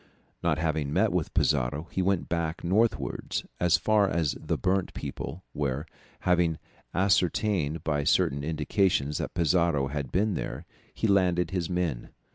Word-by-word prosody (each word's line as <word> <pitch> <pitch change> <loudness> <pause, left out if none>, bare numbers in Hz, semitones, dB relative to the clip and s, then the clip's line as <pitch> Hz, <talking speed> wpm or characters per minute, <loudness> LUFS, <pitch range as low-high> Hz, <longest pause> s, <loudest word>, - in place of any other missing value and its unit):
Not 85 -3 +1
having 80 -3 -1
met - - +2
with - - -1
Pizarro, 75 +2 +1
he 95 - -1
went 95 -1 +1
back 85 -1 -2
northwards 105 +7 0
as 90 -2 +4
far 105 -2 +3
as 80 -5 +1
the 80 +1 -2
burnt 90 +7 0
people, 80 +5 -6
where, 70 0 -2 0.4
having 85 -3 +2 0.3
ascertained 90 -4 +1
by 75 -2 0
certain 70 0 +2
indications 75 0 +1
that - - -4
Pizarro 85 -5 +2
had 70 -2 -4
been 105 +3 +1
there, - - -4 0.3
he - - -3
landed 90 -4 +2
his 90 -3 -2
men. 90 -8 -2
85 Hz, 145 wpm, -28 LUFS, 75-95 Hz, 0.4 s, as